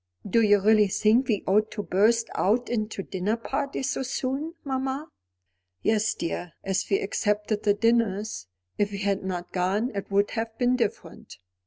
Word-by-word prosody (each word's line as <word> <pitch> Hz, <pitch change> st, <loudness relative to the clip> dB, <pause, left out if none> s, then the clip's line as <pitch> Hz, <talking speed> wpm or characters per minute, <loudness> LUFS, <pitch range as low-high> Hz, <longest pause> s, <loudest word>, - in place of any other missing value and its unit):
"Do 230 Hz, +4 st, +3 dB
you 205 Hz, -2 st, +5 dB
really 210 Hz, +1 st, +5 dB
think 220 Hz, +6 st, +3 dB
we 215 Hz, -4 st, 0 dB
ought 210 Hz, +3 st, +3 dB
to 205 Hz, -, -4 dB
burst 225 Hz, +5 st, +2 dB
out 230 Hz, +5 st, +1 dB
into 215 Hz, -4 st, -2 dB
dinner 195 Hz, +5 st, -2 dB
parties 270 Hz, +2 st, -2 dB
so -, -, -2 dB
soon, 275 Hz, +4 st, -3 dB
mamma?" 270 Hz, +2 st, -3 dB, 0.7 s
"Yes, 220 Hz, 0 st, +2 dB
dear, 170 Hz, 0 st, -4 dB
as 190 Hz, -1 st, 0 dB
we 195 Hz, -, +3 dB
accepted 210 Hz, +1 st, -1 dB
the 205 Hz, -1 st, +3 dB
dinners. 215 Hz, -, 0 dB, 0.3 s
If 205 Hz, -1 st, +2 dB
we 200 Hz, -, -4 dB
had 200 Hz, -1 st, -1 dB
not 180 Hz, -2 st, -5 dB
gone 195 Hz, +7 st, 0 dB
it 200 Hz, -1 st, -5 dB
would 200 Hz, +1 st, +2 dB
have 225 Hz, -1 st, -4 dB
been 250 Hz, 0 st, +2 dB
different." 230 Hz, -5 st, -4 dB
215 Hz, 165 wpm, -26 LUFS, 200-235 Hz, 0.7 s, you